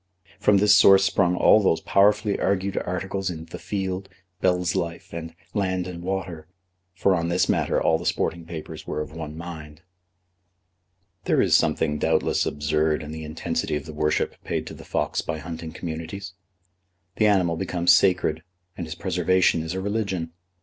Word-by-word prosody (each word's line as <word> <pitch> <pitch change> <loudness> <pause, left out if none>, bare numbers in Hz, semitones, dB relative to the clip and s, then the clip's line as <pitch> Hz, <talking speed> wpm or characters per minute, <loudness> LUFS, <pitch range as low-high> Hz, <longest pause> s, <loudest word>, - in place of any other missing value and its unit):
From 105 -1 +4
this 105 +1 +6
source 95 -1 +7
sprung 90 -2 +2
all 105 - +6
those 85 -5 +2
powerfully 105 +3 +2
argued 100 0 0
articles 95 +1 -2
in 80 -2 -6
The 80 - -9
Field, 95 -1 -3 0.3
Bell's 90 -1 +1
Life, 85 0 -4
and 80 0 -6 0.2
Land 95 -3 -1
and 90 -2 -7
Water; 90 -4 -4 0.5
for 95 +1 +2
on 85 -1 -1
this 85 +1 +2
matter - - +1
all 80 - +2
the - - -8
sporting 85 0 -1
papers 80 -2 -8
were - - -3
of 75 - -5
one 80 -1 -7
mind. 80 -2 -9 1.4
There - - +2
is - - +4
something 75 0 +1
doubtless - - +1
absurd 75 +1 0
in 75 - -7
the 80 0 -6
intensity 80 +1 -2
of 75 - -4
the 80 - -8
worship 75 0 -1
paid - - -2
to - - -8
the - - -11
fox - - -1
by 80 - -4
hunting 80 0 -7
communities. 85 +4 -6 0.8
The 110 - +4
animal 90 -5 +3
becomes 90 -1 +2
sacred, 90 -4 +2 0.3
and 85 - -5
his 80 - -6
preservation 90 -1 +2
is 80 +3 -4
a 95 - -2
religion. 100 -5 -2
85 Hz, 170 wpm, -24 LUFS, 80-95 Hz, 1.4 s, source